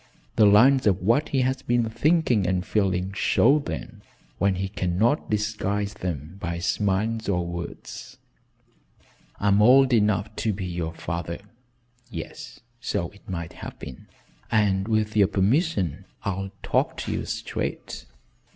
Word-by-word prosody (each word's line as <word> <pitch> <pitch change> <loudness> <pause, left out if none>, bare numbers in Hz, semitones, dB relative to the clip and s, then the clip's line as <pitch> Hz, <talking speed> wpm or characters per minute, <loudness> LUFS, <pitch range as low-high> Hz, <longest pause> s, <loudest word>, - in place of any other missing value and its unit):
The 110 -2 +6
lines 125 +5 +6
of 95 -2 +3
what 120 +10 +2
he 135 - +1
has 130 +1 0
been 120 -1 +1
thinking 120 - +2
and 90 0 0
feeling 95 -3 0
show 135 +8 +4
then 115 -6 -6 0.4
when 95 +1 +2
he 95 +1 -2
cannot 100 - 0
disguise 105 -1 -1
them 85 -2 -5
by 85 -4 -3
smiles 105 +5 0
or 90 -3 +1
words. 85 0 -7 1.2
I'm 100 0 +3
old 130 +3 +6
enough 105 -1 +2
to 110 - 0
be 95 -1 -4
your 85 -2 -4
father 85 +1 -4 0.7
yes 80 +1 -8 0.2
so 100 -8 -2
it 100 -1 -18
might 85 -3 -4
have - - -9
been 65 - -10 0.4
and 100 -3 +2
with 110 -1 0
your 100 -3 +5
permission 100 - +1 0.2
I'll 95 -1 -2
talk - - 0
to - - -4
you - - -2
straight." - - -4
100 Hz, 140 wpm, -25 LUFS, 90-115 Hz, 1.2 s, The